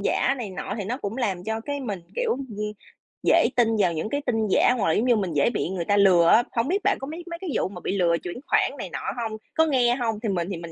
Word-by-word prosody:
giả 255 Hz, +6 st, +1 dB
này 225 Hz, -5 st, -5 dB
nọ 190 Hz, +1 st, -5 dB
thì 200 Hz, -, -3 dB
nó 230 Hz, +6 st, -2 dB
cũng 215 Hz, -4 st, -5 dB
làm 195 Hz, -8 st, -2 dB
cho 220 Hz, +1 st, -2 dB
cái 285 Hz, +4 st, -4 dB
mình, 205 Hz, -8 st, -4 dB, 0.2 s
kiểu, -, -, 0 dB
ưm, 270 Hz, -, -1 dB, 0.8 s
dễ -, -, +5 dB
tin 225 Hz, -2 st, +3 dB
vào 180 Hz, -4 st, +3 dB
những 160 Hz, +6 st, -3 dB
cái 285 Hz, +3 st, -1 dB
tin 225 Hz, -2 st, 0 dB
giả 205 Hz, -, +4 dB
hoặc 205 Hz, -, 0 dB
là, 160 Hz, -, +3 dB
giống 220 Hz, -, +1 dB
như, 245 Hz, -2 st, +4 dB
mình 190 Hz, -6 st, -1 dB
dễ 145 Hz, +8 st, +3 dB
bị 230 Hz, -, -2 dB
người 180 Hz, -3 st, -3 dB
ta 205 Hz, +2 st, +2 dB
lừa 185 Hz, -4 st, +5 dB
á. 230 Hz, +7 st, +6 dB
Hổng 230 Hz, +1 st, +1 dB
biết 390 Hz, +6 st, 0 dB
bạn -, -, +2 dB
có 270 Hz, -, -5 dB
mấy 325 Hz, +4 st, -7 dB
mấy 335 Hz, 0 st, -6 dB
cái 375 Hz, -, -4 dB
vụ -, -, +1 dB
mà 180 Hz, -2 st, -9 dB
bị 200 Hz, -, -2 dB
lừa 170 Hz, -3 st, +3 dB
chuyển 175 Hz, -, -5 dB
khoản -, -, +3 dB
này -, -, -5 dB
nọ -, -, -5 dB, 0.2 s
hông? 220 Hz, -1 st, -3 dB, 0.2 s
Có 320 Hz, -, +4 dB
nghe 250 Hz, -5 st, +3 dB
hông? 225 Hz, -4 st, -2 dB
Thì 220 Hz, -, 0 dB
mình 175 Hz, -3 st, -1 dB
thì 185 Hz, -, -3 dB
mình 170 Hz, 0 st, -8 dB
220 Hz, 295 wpm, -25 LUFS, 185-250 Hz, 0.8 s, á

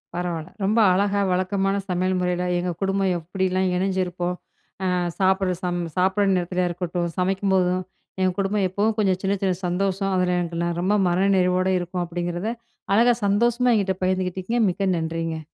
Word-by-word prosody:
பரவால்ல! 175 Hz, -2 st, -3 dB
ரொம்ப 210 Hz, +4 st, +2 dB
அழகா 200 Hz, +2 st, +1 dB
வழக்கமான 195 Hz, +2 st, 0 dB
சமையல் 185 Hz, +1 st, 0 dB
முறையில, 180 Hz, 0 st, 0 dB, 0.2 s
எங்க 180 Hz, 0 st, -2 dB
குடும்பம் 195 Hz, -1 st, +1 dB
எப்டிலாம் 185 Hz, +2 st, -1 dB
இணைஞ்சிருப்போம்? 180 Hz, -1 st, -1 dB, 0.5 s
ஆ -, -, +1 dB, 0.3 s
சாப்புடுற 190 Hz, -1 st, +2 dB
சம் 175 Hz, -1 st, -1 dB, 0.2 s
சாப்புடுற 190 Hz, +2 st, +2 dB
நேரத்துலயா 180 Hz, 0 st, 0 dB
இருக்கட்டும், 175 Hz, 0 st, -2 dB
சமைக்கும்போதும், 185 Hz, -1 st, +1 dB, 0.4 s
எங்க 185 Hz, 0 st, +3 dB
குடும்பம் 195 Hz, 0 st, +1 dB
எப்பவும் 210 Hz, +4 st, 0 dB
கொஞ்சம் 190 Hz, -3 st, +2 dB
சின்ன 195 Hz, +1 st, +1 dB
சின்ன 190 Hz, -1 st, +2 dB
சந்தோஷம் 195 Hz, +2 st, -1 dB
அதில 180 Hz, -1 st, +1 dB
எனக்கு 170 Hz, -1 st, -3 dB
நெ 170 Hz, -, 0 dB
ரொம்ப 190 Hz, +3 st, +1 dB
மன 180 Hz, +3 st, +2 dB
நிறைவோட 185 Hz, 0 st, +2 dB
இருக்கும் 180 Hz, 0 st, -3 dB
அப்டிங்கிறத, 175 Hz, +2 st, -3 dB, 0.5 s
அழகா 240 Hz, +2 st, +5 dB
சந்தோஷமா 235 Hz, +5 st, +2 dB
என்கிட்ட 195 Hz, -3 st, +1 dB
பகிர்ந்துகிட்டீங்க, 185 Hz, +4 st, -1 dB
மிக்க 190 Hz, +1 st, -1 dB
நன்றிங்க. 165 Hz, 0 st, -3 dB
185 Hz, 145 wpm, -23 LUFS, 180-195 Hz, 0.5 s, அழகா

